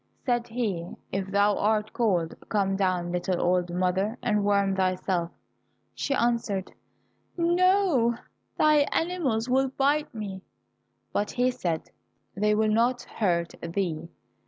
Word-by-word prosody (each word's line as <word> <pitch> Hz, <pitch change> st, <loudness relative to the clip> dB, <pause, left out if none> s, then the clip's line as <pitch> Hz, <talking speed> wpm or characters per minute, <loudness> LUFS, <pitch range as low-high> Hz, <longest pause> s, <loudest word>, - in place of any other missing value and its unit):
Said 240 Hz, -2 st, +1 dB
he, 205 Hz, -8 st, -3 dB, 0.2 s
"If 195 Hz, 0 st, -2 dB
thou 200 Hz, +1 st, +3 dB
art 215 Hz, 0 st, +1 dB
cold, 180 Hz, -9 st, +1 dB, 0.2 s
come 195 Hz, -2 st, +1 dB
down, 185 Hz, -3 st, 0 dB
little 180 Hz, 0 st, -1 dB
old 180 Hz, 0 st, +1 dB
mother, 185 Hz, +5 st, 0 dB
and 210 Hz, -1 st, +1 dB
warm 200 Hz, -1 st, +2 dB
thyself." 185 Hz, -2 st, 0 dB, 0.6 s
She 280 Hz, -, -1 dB
answered, 230 Hz, -6 st, 0 dB, 0.6 s
"No, 345 Hz, -8 st, +3 dB, 0.4 s
thy 305 Hz, 0 st, +5 dB
animals 300 Hz, -10 st, 0 dB
will 265 Hz, +1 st, +3 dB
bite 280 Hz, +3 st, +1 dB
me." 200 Hz, -4 st, -6 dB, 0.7 s
But 205 Hz, -, 0 dB
he 250 Hz, +1 st, +1 dB
said, 175 Hz, -10 st, -3 dB, 0.4 s
"They 210 Hz, +2 st, +2 dB
will 215 Hz, 0 st, +2 dB
not 240 Hz, +3 st, +2 dB
hurt 170 Hz, -5 st, -1 dB
thee." 170 Hz, -2 st, -3 dB
210 Hz, 125 wpm, -27 LUFS, 185-245 Hz, 0.7 s, thy